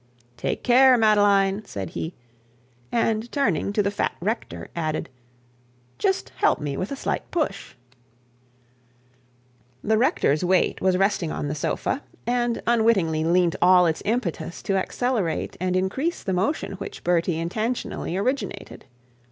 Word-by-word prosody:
'Take - - -3
care, 255 +1 +6
Madeline,' 205 -2 +3
said 95 - -6
he; 160 - -5 0.8
and 230 0 0
turning 200 - 0
to 205 0 +1
the 200 - 0
fat 205 - -1
rector, 170 - -3
added, 155 -2 -2 0.9
'Just 130 -3 0
help - - +3
me 145 -2 -3
with 185 - -4
a - - -2
slight - - -3
push.' 300 - -3 2.1
The 220 +1 +2
rector's 155 - +2
weight 180 0 +2
was 185 -1 +3
resting 195 -4 +1
on 145 - -3
the - - -2
sofa, 205 - -2 0.2
and 240 -1 0
unwittingly 220 -9 +2
lent 170 +1 +2
all 180 0 +6
its 160 -2 0
impetus 200 -7 -2
to 195 - 0
accelerate 205 -2 -1
and 185 +1 0
increase 260 - -1
the 190 - -1
motion 195 - -1
which 195 - -7
Bertie 175 -1 +1
intentionally 200 +1 -3
originated. 225 -2 -3
195 Hz, 135 wpm, -24 LUFS, 170-230 Hz, 2.1 s, care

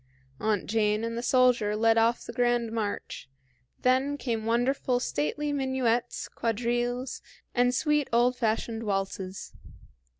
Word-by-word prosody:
Aunt 215 -3 0
Jane 210 0 +1
and 230 0 -3
the 235 - -2
soldier 245 -4 +3
led 225 +1 +3
off 230 +1 +2
the - - -7
grand 240 -2 +1
march; 215 -10 -4 0.5
then 265 +3 +2
came 225 -5 -3
wonderful, 245 +2 +1
stately 250 - -2
minuets, 260 -3 0
quadrilles, 240 +2 -2 0.3
and 245 0 +2
sweet 300 0 +1
old 240 +2 +3
fashioned 225 -1 -1
waltzes. 195 -2 -3
235 Hz, 125 wpm, -28 LUFS, 220-250 Hz, 0.5 s, soldier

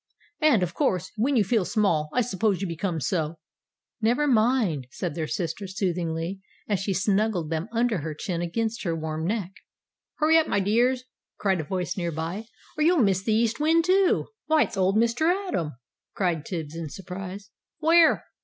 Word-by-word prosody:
And, 295 - +4
of 175 -1 -2
course, 190 - 0
when 255 +6 +1
you 225 - +4
feel 205 +1 +1
small, 180 -5 +1
I 250 - +2
suppose 210 -4 0
you 195 - -2
become 170 0 -2
so!" 160 +3 -1 0.6
"Never 240 +7 +2
mind," 220 - +2
said 135 - -4
their 155 0 -3
sister, 175 +4 -3
soothingly, 180 -2 -2 0.3
as 205 -3 0
she 195 - -2
snuggled 195 -3 +1
them 160 +6 -2
under 230 -3 +1
her 155 0 -5
chin 170 +2 -3
against 225 +6 -2
her 170 -4 -1
warm 160 0 -3
neck. 200 -3 -2 0.6
"Hurry 320 +1 +5
up, 320 - 0
my - - +1
dears!" 240 +6 +2 0.3
cried 190 -3 +1
a - - -8
voice 180 +2 -3
near 170 -2 -1
by, 165 +7 -4 0.3
"or - - +3
you'll 345 +3 +4
miss 195 - +3
the 220 - -1
East 230 +2 +1
Wind, 325 +2 +3
too." 375 +1 +3 0.2
"Why, 315 0 +5
it's - - -6
old 190 +1 +2
Mr. 235 +9 +3 0.2
Atom!" 165 - -2 0.4
cried 170 -6 -1
Tibbs, 160 -4 -5
in 165 -2 -5
surprise. 195 +3 -8 0.3
"Where? 325 +1 +5
195 Hz, 180 wpm, -26 LUFS, 170-235 Hz, 0.6 s, Hurry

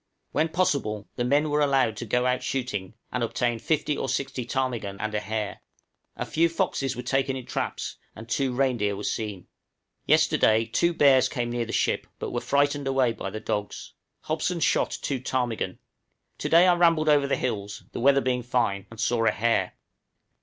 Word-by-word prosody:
When 160 - +1
possible 140 - 0
the 120 - -1
men 145 +4 +2
were 150 0 +2
allowed 135 -6 +2
to 120 - -5
go 125 +4 +1
out 125 0 +1
shooting, 110 -7 -3 0.2
and 125 - -2
obtain 120 0 -1
fifty 150 +3 0
or 135 - -3
sixty 130 -3 -2
ptarmigan 120 -7 -2
and 110 0 -3
a 105 - +1
hare; 105 0 -4 0.5
a - - -3
few 170 +1 +2
foxes 135 -5 -1
were 125 - -5
taken 135 +1 0
in 130 -2 -6
traps, - - -4 0.2
and 115 - -10
two 130 +3 0
reindeer 125 -6 +1
were 100 - -7
seen. 105 -5 -3 0.6
Yesterday 110 +1 +4
two 170 +10 +1
bears 135 -4 +5
came 120 -3 -2
near 120 -1 -1
the 115 - -6
ship, - - 0
but - - -5
were - - -2
frightened 145 0 +1
away 130 -3 +2
by - - -5
the 110 - -6
dogs. 105 -1 -4 0.3
Hobson 160 +3 -1
shot - - +2
three 135 -3 -2
ptarmigan. 125 -3 -2 0.6
To - - -2
day 170 +2 +7
I 180 - +6
rambled 165 -3 +3
over 145 -2 +4
the 140 - +1
hills, 105 -4 -3
the - - -5
weather 140 +2 +4
being 125 -1 0
fine, 115 -6 -1
and 115 - -12
saw 115 +1 +1
a - - +5
hare. 115 +2 +1
125 Hz, 190 wpm, -26 LUFS, 110-140 Hz, 0.6 s, day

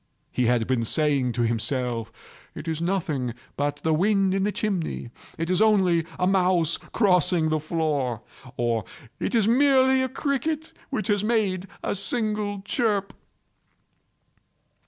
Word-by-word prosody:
He 125 -2 +1
had 120 -2 +2
been 125 -2 0
saying 140 -1 +1
to 120 +1 0
himself—"It 115 +3 -4
is 160 0 -2
nothing 160 -10 -1 0.2
but 145 0 -1
the 160 - +2
wind 195 +3 +2
in 195 0 +1
the 210 - +1
chimney—it 165 - -4
is 185 +2 +2
only 185 -7 +3
a 180 - +1
mouse 180 -3 +2
crossing 180 -5 +2
the 155 0 +1
floor," 150 -7 -1 0.3
or 115 -2 0 0.4
"It - - -1
is 220 -3 +3
merely 265 +1 +4
a 260 - 0
cricket 295 +4 -2 0.2
which 255 -6 -2
has 205 -1 +2
made 205 -5 0 0.2
a - - 0
single 205 -1 -1
chirp." 205 -3 0
180 Hz, 135 wpm, -25 LUFS, 145-210 Hz, 0.4 s, merely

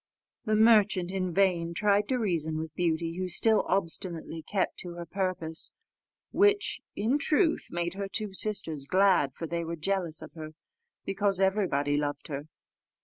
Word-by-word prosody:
The 215 -1 +2
merchant 210 -5 +4
in 185 -2 -2
vain 170 -2 +1
tried 205 +1 +2
to 260 - 0
reason 165 -8 -1
with 160 -1 -5
Beauty, 165 0 -1
who 185 - -1
still 220 +5 +3
obstinately 170 -3 -2
kept 185 +4 -2
to 175 -1 -5
her 175 0 -6
purpose; 175 -3 -4 0.6
which, 410 0 +2
in 235 +8 +1
truth, 315 +3 +2
made 175 0 -2
her 200 0 -4
two 210 -3 -2
sisters 165 -9 -2
glad, 185 -8 +3
for 165 - -5
they 170 +1 -3
were 165 +1 -4
jealous 170 -1 -1
of 155 - -11
her, 155 -1 -9 0.5
because 195 -1 +1
everybody 180 -8 +1
loved 145 +1 -3
her. 145 +1 -5
180 Hz, 155 wpm, -29 LUFS, 160-200 Hz, 0.6 s, merchant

